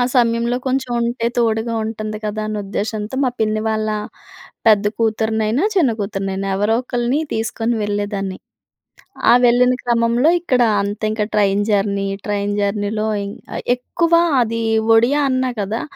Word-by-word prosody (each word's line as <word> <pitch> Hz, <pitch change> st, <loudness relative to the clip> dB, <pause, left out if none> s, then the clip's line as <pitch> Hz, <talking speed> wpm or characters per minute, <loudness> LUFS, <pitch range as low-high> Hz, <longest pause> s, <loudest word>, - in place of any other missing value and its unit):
సమయంలో 235 Hz, 0 st, +2 dB
కొంచెం 260 Hz, -1 st, -1 dB
ఉంటే 235 Hz, 0 st, -1 dB
తోడుగా 230 Hz, 0 st, 0 dB
ఉంటుంది 215 Hz, -1 st, -4 dB
కదా 210 Hz, +1 st, -3 dB
అనే 215 Hz, 0 st, -3 dB
ఉద్దేశంతో 210 Hz, +3 st, -4 dB
మా 255 Hz, -, +1 dB
పిన్ని 215 Hz, 0 st, +1 dB
వాళ్ళ, 215 Hz, 0 st, -1 dB, 0.8 s
పెద్ద 210 Hz, -2 st, +5 dB
కూతురినైనా, 220 Hz, -, 0 dB
చిన్న 315 Hz, -10 st, +3 dB
కూతురినైనా 195 Hz, -1 st, -3 dB
ఎవరో 210 Hz, +3 st, +1 dB
ఒకల్ని 245 Hz, +4 st, -1 dB
తీసుకొని 225 Hz, +1 st, -1 dB
వెళ్ళేదాన్ని. 205 Hz, -2 st, -3 dB, 0.9 s
ఆ -, -, +8 dB
వెళ్ళిన 250 Hz, +1 st, +4 dB
క్రమంలో 235 Hz, +4 st, +2 dB
ఇక్కడ 260 Hz, -8 st, +1 dB, 0.2 s
అంత 205 Hz, +2 st, -4 dB
ఇంక 215 Hz, -1 st, -1 dB
ట్రైన్ 200 Hz, -1 st, +2 dB
జర్నీ, 200 Hz, -1 st, +1 dB, 0.2 s
ట్రైన్ 205 Hz, 0 st, -1 dB
జర్నీలో 205 Hz, +1 st, -1 dB, 0.2 s
ఇం 200 Hz, -, -5 dB, 0.4 s
ఎక్కువ 330 Hz, +7 st, -2 dB, 0.3 s
అది 230 Hz, 0 st, -1 dB, 0.3 s
ఒడియా 260 Hz, +6 st, +3 dB
అన్నా 255 Hz, -1 st, 0 dB
కదా! 210 Hz, +4 st, -2 dB
220 Hz, 130 wpm, -19 LUFS, 205-240 Hz, 0.9 s, ఆ